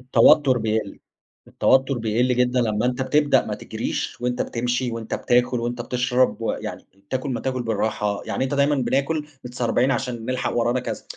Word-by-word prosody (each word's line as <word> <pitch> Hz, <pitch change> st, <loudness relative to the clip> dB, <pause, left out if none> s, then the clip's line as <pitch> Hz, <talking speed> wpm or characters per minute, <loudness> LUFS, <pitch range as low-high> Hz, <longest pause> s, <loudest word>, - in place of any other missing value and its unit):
التوتر 130 Hz, +2 st, +5 dB
بيقل، 110 Hz, -2 st, -2 dB, 0.5 s
التوتّر 135 Hz, -1 st, +2 dB
بيقل 115 Hz, +3 st, +1 dB
جدًا 125 Hz, 0 st, +2 dB
لمّا 110 Hz, 0 st, 0 dB
أنت 125 Hz, +1 st, -1 dB
بتبدأ 145 Hz, +2 st, +3 dB
ما -, -, -2 dB
تجريش -, -, -4 dB
وأنت 125 Hz, 0 st, -1 dB
بتمشي 125 Hz, +1 st, -2 dB
وأنت 115 Hz, -1 st, -4 dB
بتاكل 125 Hz, 0 st, +1 dB
وأنت 120 Hz, +1 st, -3 dB
بتشرب، 125 Hz, +1 st, +1 dB
ويعني 115 Hz, -, -4 dB, 0.2 s
تاكل 130 Hz, +1 st, -2 dB
ما 125 Hz, -, -2 dB
تاكل 130 Hz, -2 st, -2 dB
بالراحه، 105 Hz, -2 st, -1 dB
يعني -, -, -1 dB
أنت 135 Hz, +2 st, -2 dB
دايمًا 140 Hz, +1 st, +3 dB
بناكل 140 Hz, +4 st, 0 dB, 0.2 s
متسربعين 125 Hz, +1 st, 0 dB
عشان 125 Hz, -4 st, -2 dB
نلحق 130 Hz, 0 st, -1 dB
ورانا 120 Hz, +2 st, +1 dB
كذا، -, -, -5 dB
125 Hz, 160 wpm, -23 LUFS, 115-130 Hz, 0.5 s, التوتر